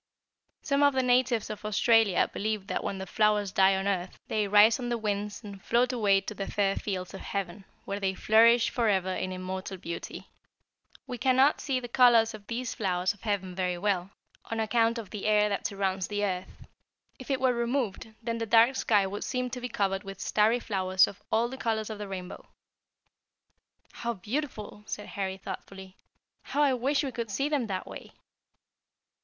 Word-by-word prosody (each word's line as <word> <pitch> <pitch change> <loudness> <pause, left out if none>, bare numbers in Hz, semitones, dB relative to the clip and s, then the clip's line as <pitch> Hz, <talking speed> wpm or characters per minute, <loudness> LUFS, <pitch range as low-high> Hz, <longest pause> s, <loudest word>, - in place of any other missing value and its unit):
"Some 280 0 +1
of 285 -1 +4
the 260 - +2
natives 250 -3 +2
of 215 - -8
Australia 215 -1 +3
believe 215 -1 -2
that - - -3
when 195 - -3
the 190 - -5
flowers 210 0 +1
die 190 0 +4
on 190 +1 -2
earth 185 -2 -2
they 210 -2 0
rise 210 +4 +6
on 245 -1 -3
the 240 - 0
winds 210 0 -3
and 200 -2 -9
float 245 +2 +2
away 200 -5 +3
to 205 - -6
the 195 -1 -5
fair 195 -1 +1
fields 185 -3 -4
of 195 - -8
heaven, 195 0 -4 0.2
where 200 +1 -3
they 190 -1 -1
flourish 230 +4 +5
forever 195 -6 +1
in 185 0 -3
immortal 185 +1 -5
beauty. 170 -1 -7 0.8
We 245 -1 -6
cannot 265 +3 +3
see 270 -3 -1
the 245 - -7
colors 235 -2 +5
of 210 -1 -11
these 240 +1 -3
flowers 185 -3 0
of 205 - -23
heaven 200 -4 -2
very 180 -1 -1
well, 190 -1 -1 0.4
on 225 - -4
account 230 +1 +2
of 225 -4 -7
the 210 -1 -4
air 210 0 +4
that 200 - -1
surrounds 195 -2 -2
the 205 0 -1
earth. 185 -2 -5 0.5
If 255 - -11
it 270 -2 +1
were 260 -1 +3
removed, 235 -3 -2
then 230 0 -2
the 230 - -3
dark 230 +4 +5
sky 205 -3 +3
would 200 +2 -4
seem 250 -1 -2
to 250 0 -5
be 250 - -4
covered 195 -2 -1
with 195 -1 -9
starry 215 +5 +2
flowers 190 -4 +2
of 200 - -10
all 230 +2 +2
the 260 +2 -8
colors 220 -1 -1
of 210 - -7
the 205 - -5
rainbow." 185 -2 -7 1.5
"How 235 0 -3
beautiful!" 215 0 -5
said 210 - -5
Harry 190 -1 -3
thoughtfully. 190 0 -9 0.5
"How 290 +2 0
I 280 -2 +3
wish 270 +4 +1
we 270 - -3
could 235 -2 -4
see 275 +9 -1
them 280 -6 0
that 190 -2 -3
way!" - - -10
210 Hz, 190 wpm, -28 LUFS, 195-235 Hz, 1.5 s, rise